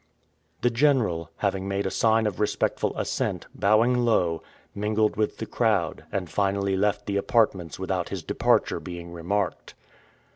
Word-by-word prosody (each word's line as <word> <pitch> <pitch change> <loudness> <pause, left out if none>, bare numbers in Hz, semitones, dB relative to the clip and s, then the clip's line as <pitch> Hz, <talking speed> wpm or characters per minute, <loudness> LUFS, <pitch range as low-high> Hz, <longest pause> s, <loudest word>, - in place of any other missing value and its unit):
The 120 - +3
General, 115 - +2
having 95 -1 -1
made 100 0 -1
a 95 - -1
sign 110 0 +3
of 105 -4 -2
respectful 105 - 0
assent, - - -2
bowing 115 +5 +3
low, 90 -9 +2 0.3
mingled 105 +1 +1
with 105 0 -1
the 110 - -4
crowd, 100 -10 0
and 95 -3 -2
finally 100 +1 0
left 100 +2 0
the 100 -1 -1
apartments 100 - +1
without - - -2
his - - -5
departure - - +1
being 85 -1 -8
remarked. 90 +2 -2
100 Hz, 145 wpm, -26 LUFS, 90-110 Hz, 0.3 s, The